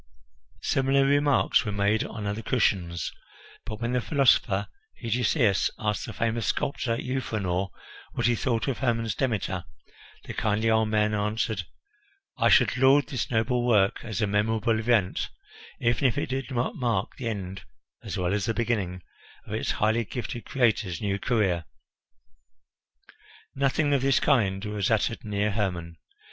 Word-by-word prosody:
Similar 135 +1 +2
remarks 145 0 +3
were 105 - -3
made 100 +2 +1
on 105 -1 -6
other 105 +2 -2
cushions; 95 -8 0 0.6
but 110 -2 -5
when 120 +1 -2
the 125 0 +1
philosopher 115 -8 +3 0.3
Hegesias 115 -2 +2
asked 105 -1 -2
the - - -5
famous 115 0 -1
sculptor 115 -4 -1
Euphranor 105 -8 -2 0.4
what - - -1
he 120 - +4
thought 115 +1 -1
of 135 - -1
Hermon's 115 -4 0
Demeter, 100 -8 -1 0.6
the - - -7
kindly 110 +1 +1
old 110 -1 +3
man 105 0 +2
answered, 105 -2 -1 0.7
"I - - +3
should - - +4
laud 135 +3 +4
this 130 -6 -2
noble 120 +1 +1
work 105 -5 +3
as 110 -4 -3
a - - +4
memorable 110 +2 +1
event, 110 -5 +1 0.5
even 120 0 +1
if 115 - -1
it - - -1
did 135 -1 -3
not 125 -2 -1
mark 115 -6 -1
the 125 - -4
end, 100 -2 -5 0.4
as - - -4
well 90 +1 0
as 105 -1 0
the 115 -1 -1
beginning, 100 -7 -1 0.4
of - - -7
its - - -1
highly 110 +2 +1
gifted 120 +3 -6
creator's 110 -8 +1
new 100 -1 -1
career." 95 -8 +1 1.9
Nothing 140 +2 +1
of 140 - +2
this 135 0 +3
kind 105 -8 +2
was 105 -2 -1
uttered 110 +1 0
near 105 -1 0
Hermon. 90 -5 -2
110 Hz, 150 wpm, -27 LUFS, 100-125 Hz, 1.9 s, he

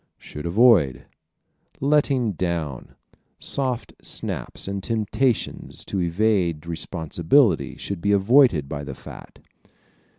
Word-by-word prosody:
Should 75 +3 -8
Avoid 95 - +4 0.7
¶ - - -28
"Letting 140 -5 +2
down," 80 -7 -4 0.4
soft 130 -3 -3
snaps - - -5
and 100 -1 -4
temptations 115 +3 -1
to 95 - -2
evade 85 -3 +1
responsibility 85 - +1
should 100 -4 -5
be 100 - +1
avoided 100 - +4
by 70 0 -5
the 70 -2 -7
fat. - - -12
95 Hz, 105 wpm, -23 LUFS, 80-120 Hz, 0.7 s, Avoid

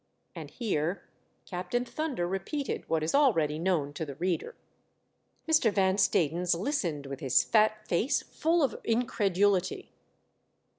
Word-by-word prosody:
And - - -8
here 185 -6 -2 0.4
Captain 185 +7 -3
Thunder 265 - -3
repeated 195 - -4
what 160 -1 +1
is 155 - -1
already 165 - +3
known 165 -5 0
to 160 - -4
the 140 -3 -6
reader, 180 - -2 0.9
Mr. 300 -9 +4
Van 190 -1 +2
Stadens 170 0 +2
listened 180 - -2
with 135 -1 -6
his 130 -2 +3
fat 215 -1 +2
face 215 - +1
full 330 0 0
of 260 -6 0
incredulity. 205 -5 +1
190 Hz, 130 wpm, -29 LUFS, 165-235 Hz, 0.9 s, Mr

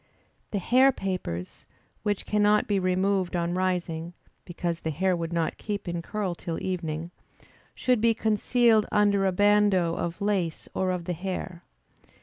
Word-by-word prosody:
The 205 - -2
hair 255 +8 +4
papers, 180 - -5 0.3
which 205 -2 -1
cannot 210 0 +3
be 205 -2 +1
removed 185 0 +1
on 170 0 0
rising 175 -2 -2 0.3
(because 170 -1 -3
the 160 - -2
hair 185 +4 +1
would 165 -1 -4
not 170 -1 -1
keep 205 -2 -4
in 175 -1 -2
curl 200 0 -3
till 170 -1 -5
evening,) 170 -3 -3 0.6
should 250 -3 +1
be 230 0 +4
concealed 220 0 +3
under 200 -2 +3
a - - +2
bandeau 205 -3 +3
of 170 +1 -3
lace 195 -6 -1
or 190 - 0
of 180 -2 -2
the 180 - -2
hair. 180 0 -5
185 Hz, 150 wpm, -27 LUFS, 170-205 Hz, 0.6 s, hair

